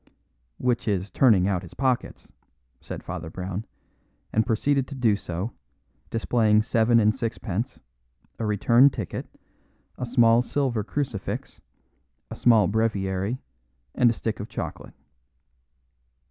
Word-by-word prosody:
"Which 125 -2 0
is 100 -2 -1
turning 105 -8 +4
out 95 -3 0
his 90 - -12
pockets," 130 -3 -2 0.5
said - - -8
Father 90 -3 -6
Brown, 95 +4 -5 0.7
and 110 +2 +2
proceeded 135 +4 +1
to 140 - -8
do 115 -5 +3
so, 95 +2 -4 0.6
displaying 110 -2 +2
seven 115 0 +3
and 110 -1 +4
sixpence, 115 +1 -3 0.6
a 115 - -1
return 115 +6 +5
ticket, 110 - -5 0.7
a 125 - -3
small 115 -1 +5
silver 125 -4 -1
crucifix, 120 -4 -4 0.7
a - - -5
small 115 -4 +5
breviary, 100 0 0 0.6
and 120 - +4
a - - +2
stick 110 -1 -3
of 105 - -6
chocolate. - - -6
110 Hz, 120 wpm, -25 LUFS, 100-120 Hz, 0.7 s, return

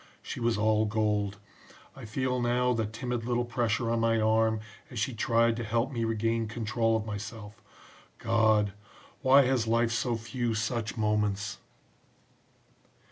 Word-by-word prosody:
She - - -6
was 115 -1 +1
all 110 0 +2
gold. 105 -2 0 0.6
I - - -9
feel 125 +3 -1
now 125 +1 +2
the 115 -3 -1
timid 120 +2 -4
little 120 0 0
pressure 115 -1 0
on 115 - +1
my 115 0 +2
arm 110 0 +2 0.3
as 120 - -9
she 110 +4 -1
tried 115 0 +2
to 120 - -3
help 115 +4 0
me 115 -3 -1
regain 115 0 0
control 115 +1 0
of 110 - -5
myself. 105 0 -7 0.6
God! 110 -3 +2 0.5
why 135 0 +6
has 125 -3 +1
life 115 +1 +2
so 120 +1 0
few 115 0 -2
such 110 +1 -2
moments!" 105 -2 0
115 Hz, 145 wpm, -29 LUFS, 110-120 Hz, 0.6 s, why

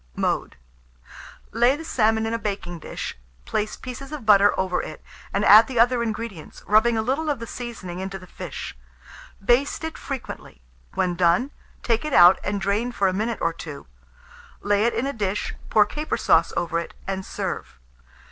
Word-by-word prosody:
Mode. - - -1 1.0
Lay 240 +4 +3
the 325 +2 -8
salmon 220 -5 +2
in 225 - -2
a 230 - -1
baking 195 -5 -4
dish, - - -6 0.3
place 210 - -2
pieces 265 +2 -8
of 295 -7 -6
butter 205 -1 +6
over 185 -1 0
it, 155 - -9 0.3
and 200 +1 0
add 215 +3 +9
the 255 -3 -2
other 240 +1 +4
ingredients, 220 -6 -5
rubbing 220 +2 +4
a 220 - +1
little 280 +7 -1
of 290 - 0
the 230 - -6
seasoning 220 -8 -7
into 190 +1 -4
the 185 - -13
fish; - - -7 0.7
baste 255 +8 +2
it 320 0 -5
frequently; 265 - -7 0.4
when 180 -1 +1
done, 175 +10 +2 0.3
take 230 -2 +1
it 305 -2 -3
out 175 +1 +8
and 205 +1 -1
drain 205 +5 0
for 200 -5 +1
a 185 - +1
minute 220 +4 -1
or 165 - +1
two; 155 -3 -9 0.8
lay 205 +1 +2
it 235 - +1
in 250 - 0
a 280 - -2
dish, 205 -3 -2 0.2
pour 210 -1 +5
caper 300 +8 -3
sauce - - +3
over 170 -1 0
it, 170 - -7
and 190 0 -3
serve. - - -5
215 Hz, 180 wpm, -24 LUFS, 190-240 Hz, 1.0 s, add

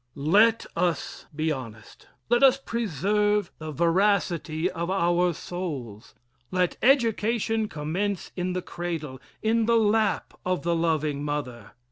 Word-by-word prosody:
LET 205 +11 +4
us 175 -4 -2
be 155 +1 0
honest. 115 -6 -8 0.2
Let 240 - +3
us 270 -1 +6
preserve 210 - 0
the 155 0 -6
veracity 170 -1 +1
of 170 -1 -4
our 175 -1 +2
souls. 145 - -6 0.3
Let 180 -1 0
education 225 -3 +2
commence 180 +5 -3
in 180 0 -2
the 185 -1 -3
cradle 160 -7 -5 0.2
in 225 0 +2
the 235 0 +4
lap 220 0 +1
of 185 0 -1
the 170 0 +1
loving 155 -3 0
mother. 130 -7 -4
175 Hz, 125 wpm, -26 LUFS, 155-210 Hz, 0.3 s, us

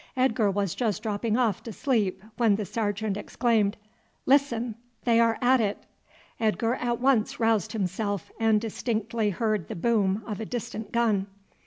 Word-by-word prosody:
Edgar 230 -5 +3
was 195 -2 -1
just 225 -5 -1
dropping 215 +1 0
off 230 -7 +1
to 230 - -7
sleep, 215 -7 0
when 230 -4 +3
the 210 0 -3
sergeant 205 -1 -2
exclaimed, 220 -1 +1 0.5
"Listen! 250 -4 +2 0.3
they 230 -1 +4
are 230 -1 +3
at 255 0 +5
it." 205 -2 -2 0.6
Edgar 225 +1 +1
at 240 -2 -1
once 250 -4 +2
roused 225 -4 +1
himself, 200 -1 -2
and 220 -1 +4
distinctly 225 0 -1
heard 210 -2 -1
the - - -5
boom 205 0 +1
of 210 -2 -5
a 220 - -3
distant 225 -2 -5
gun. 220 -5 +1
220 Hz, 155 wpm, -27 LUFS, 205-235 Hz, 0.6 s, at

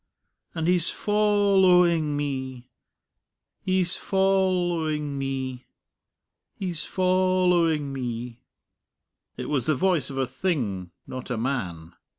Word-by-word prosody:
And 160 -1 -1
he's 180 -1 +3
foll 205 -2 +2
owing 170 -5 +4
me... 130 -3 -4 0.9
he's 185 -1 +3
foll 190 -2 +1
owing 150 -3 -2
me... 130 -2 -4 0.9
he's 175 -5 -2
foll 185 0 +2
owing 160 -5 +1
me." 120 -2 -5 1.0
It - - -5
was 135 -5 -1
the 155 - +3
voice 175 +1 +1
of 135 - -7
a 135 - +1
thing, 125 - -2 0.2
not 130 -1 -7
a 125 - -2
man. 95 -10 -3
155 Hz, 115 wpm, -25 LUFS, 130-185 Hz, 1.0 s, owing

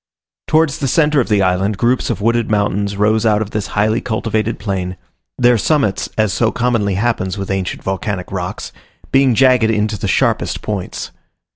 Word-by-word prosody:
Towards 155 -2 +2
the 135 - -1
centre 150 +1 +3
of - - -4
the 105 -2 +3
island 95 +2 0
groups 120 +5 +1
of - - -2
wooded 115 +1 +1
mountains 100 -1 0
rose 110 +2 +2
out 105 -2 +3
of 110 -1 -4
this 105 -1 -3
highly 110 +3 +2
cultivated 110 -1 -2
plain; 95 -3 -3 0.4
their 120 -2 +4
summits, 140 -7 0
as 110 -4 +1
so 110 +3 +1
commonly 115 -5 0
happens 100 -3 -1
with 100 0 -4
ancient 95 -1 -3
volcanic 95 -1 -3
rocks, 90 -2 -5 0.4
being 135 -3 +4
jagged 125 -3 +4
into 105 -1 0
the - - -2
sharpest - - 0
points. 100 -4 -4
110 Hz, 170 wpm, -17 LUFS, 100-120 Hz, 0.4 s, their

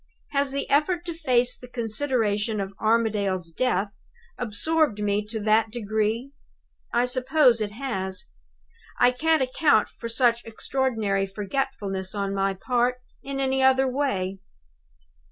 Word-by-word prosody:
Has 280 -1 +1
the 280 +1 -3
effort 340 +5 +1
to 340 - -4
face 250 -6 +1
the 250 - -12
consideration 225 -3 -1
of 195 0 -4
Armadale's 210 -6 +1
death 200 0 0 0.4
absorbed 265 +3 +1
me 205 0 0
to 220 +1 -4
that 220 +1 +3
degree? 220 +3 -2 0.6
I 240 +1 +2
suppose 255 -1 +3
it 205 -1 -2
has. 190 -7 -4 0.7
I 245 - +5
can't 315 +3 +2
account 255 -3 +2
for 230 - -8
such 235 0 +2
extraordinary 220 -4 -1
forgetfulness 200 -2 -3
on 200 -1 -2
my 195 0 0
part 245 +4 +1 0.3
in 275 0 -5
any 265 0 +1
other 265 0 +4
way. 200 -9 -1
235 Hz, 130 wpm, -25 LUFS, 205-265 Hz, 0.7 s, I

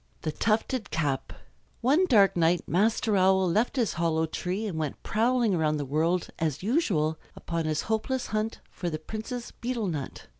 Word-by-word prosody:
THE 155 - -1
TUFTED 220 - 0
CAP 145 -4 -1 0.5
One 295 +10 +3
dark 205 - +5
night 170 +1 +2
Master 215 +3 +2
Owl 190 0 +4
left 215 +10 +1
his 240 -5 +1
hollow 160 -1 +1
tree 180 +6 -3
and 180 -7 -3
went 150 -3 -4
prowling 235 -1 +2
about 155 -3 +1
the 145 - -3
world 160 +6 0
as 155 -1 -1
usual 185 - +1 0.2
upon 165 -1 -3
his 155 -1 0
hopeless 230 +4 -1
hunt 215 +1 -1
for 175 - -3
the 155 - -3
Princess's 220 +8 -6
betel 240 -2 -3
nut. 150 -8 -4
190 Hz, 165 wpm, -28 LUFS, 160-225 Hz, 0.5 s, dark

